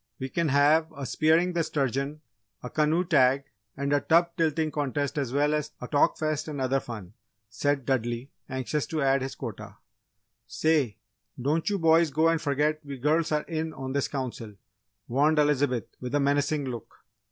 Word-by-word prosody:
"We 130 Hz, 0 st, -5 dB
can 170 Hz, +4 st, 0 dB
have 150 Hz, +3 st, +4 dB
a 140 Hz, -, -4 dB
'Spearing 160 Hz, +6 st, +2 dB
the 170 Hz, -, +1 dB
Sturgeon,' 140 Hz, +1 st, -2 dB, 0.4 s
a 125 Hz, -, -6 dB
canoe 155 Hz, +3 st, +2 dB
tag, 140 Hz, -5 st, +4 dB, 0.3 s
and 140 Hz, +1 st, -1 dB
a 145 Hz, -, +3 dB
tub 170 Hz, +1 st, +3 dB
tilting 160 Hz, -2 st, 0 dB
contest 145 Hz, -1 st, -2 dB
as 135 Hz, -4 st, -2 dB
well 145 Hz, +2 st, +2 dB
as 150 Hz, 0 st, -2 dB
a 125 Hz, -, -6 dB
Talk 145 Hz, +1 st, +2 dB
Fest 155 Hz, -1 st, -1 dB
and 150 Hz, -2 st, -5 dB
other 130 Hz, +1 st, +1 dB
fun!" 105 Hz, -7 st, -8 dB, 0.4 s
said 135 Hz, +6 st, -1 dB
Dudley, 120 Hz, 0 st, -1 dB, 0.2 s
anxious 130 Hz, +3 st, -2 dB
to 155 Hz, -3 st, -1 dB
add 135 Hz, 0 st, +3 dB
his 135 Hz, +1 st, -4 dB
quota. 115 Hz, -7 st, -8 dB, 0.7 s
"Say, 150 Hz, -, +1 dB, 0.4 s
don't 150 Hz, +8 st, 0 dB
you 205 Hz, -, 0 dB
boys 165 Hz, -1 st, +4 dB
go 155 Hz, +3 st, +3 dB
and 165 Hz, -1 st, +1 dB
forget 150 Hz, +2 st, 0 dB
we 140 Hz, -2 st, -7 dB
girls 155 Hz, +5 st, +1 dB
are 150 Hz, -1 st, +1 dB
in 160 Hz, -1 st, -3 dB
on 130 Hz, 0 st, -5 dB
this 140 Hz, -1 st, 0 dB
Council!" 120 Hz, -6 st, -5 dB, 0.5 s
warned 145 Hz, +5 st, +2 dB
Elizabeth, 145 Hz, -6 st, +2 dB
with 125 Hz, +2 st, -4 dB
a -, -, +3 dB
menacing 145 Hz, +1 st, +1 dB
look. 120 Hz, -4 st, -8 dB
145 Hz, 175 wpm, -27 LUFS, 130-155 Hz, 0.7 s, have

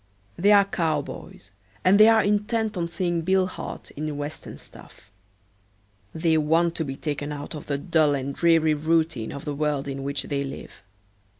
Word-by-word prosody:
They 200 Hz, +4 st, +3 dB
are 200 Hz, -1 st, +7 dB
cowboys 155 Hz, -, -4 dB, 0.3 s
and 195 Hz, +3 st, +5 dB
they 215 Hz, -, +9 dB
are 225 Hz, -1 st, +5 dB
intent 210 Hz, +2 st, 0 dB
on 170 Hz, -2 st, -1 dB
seeing 175 Hz, 0 st, -1 dB
Bill 190 Hz, +2 st, +2 dB
Hart 185 Hz, -, -7 dB
in 150 Hz, 0 st, -5 dB
Western 145 Hz, +1 st, -6 dB
stuff. 95 Hz, -, -15 dB, 1.0 s
They 160 Hz, -1 st, +1 dB
want 165 Hz, +3 st, +2 dB
to 160 Hz, -, 0 dB
be 135 Hz, -3 st, -5 dB
taken 145 Hz, 0 st, -4 dB
out 145 Hz, 0 st, -6 dB
of 150 Hz, -, -8 dB
the 140 Hz, -, -1 dB
dull 155 Hz, -2 st, +2 dB
and 140 Hz, 0 st, -3 dB
dreary 165 Hz, -1 st, +3 dB
routine 155 Hz, -5 st, 0 dB
of 140 Hz, -, -8 dB
the 150 Hz, -, -3 dB
world 145 Hz, -1 st, -1 dB
in 135 Hz, 0 st, -4 dB
which 140 Hz, 0 st, -2 dB
they 140 Hz, -1 st, -2 dB
live. 135 Hz, 0 st, -7 dB
155 Hz, 175 wpm, -25 LUFS, 145-175 Hz, 1.0 s, they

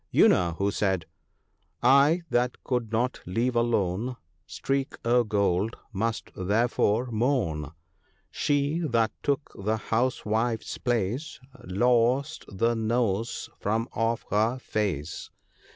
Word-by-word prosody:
You -, -, +6 dB
know 85 Hz, -2 st, +2 dB
who 100 Hz, +1 st, +1 dB
said 95 Hz, -5 st, 0 dB, 0.3 s
— -, -, -46 dB, 0.2 s
" -, -, -32 dB
I 140 Hz, +7 st, +5 dB
that 120 Hz, +1 st, 0 dB
could 120 Hz, -4 st, -1 dB
not 120 Hz, +3 st, 0 dB
leave 120 Hz, +7 st, 0 dB
alone 115 Hz, 0 st, 0 dB
* 90 Hz, +3 st, -44 dB
Streak 135 Hz, 0 st, -1 dB
o' 120 Hz, +1 st, +4 dB
Gold,' 100 Hz, -1 st, 0 dB, 0.2 s
must 110 Hz, +3 st, -2 dB
therefore 110 Hz, +4 st, +1 dB
moan. 105 Hz, -, 0 dB, 0.6 s
She 145 Hz, +2 st, 0 dB
that 115 Hz, -9 st, +1 dB
took 140 Hz, 0 st, -1 dB
the 110 Hz, +2 st, +1 dB
House 120 Hz, +4 st, -1 dB
wife's 110 Hz, +1 st, -1 dB
place 120 Hz, -, -1 dB, 0.3 s
Lost 125 Hz, +9 st, +1 dB
the 115 Hz, +4 st, +1 dB
nose 115 Hz, -1 st, -1 dB
from 110 Hz, +3 st, 0 dB
off 115 Hz, +1 st, -1 dB
her 110 Hz, +4 st, +2 dB
face. 90 Hz, -, -3 dB
115 Hz, 125 wpm, -27 LUFS, 105-125 Hz, 0.6 s, You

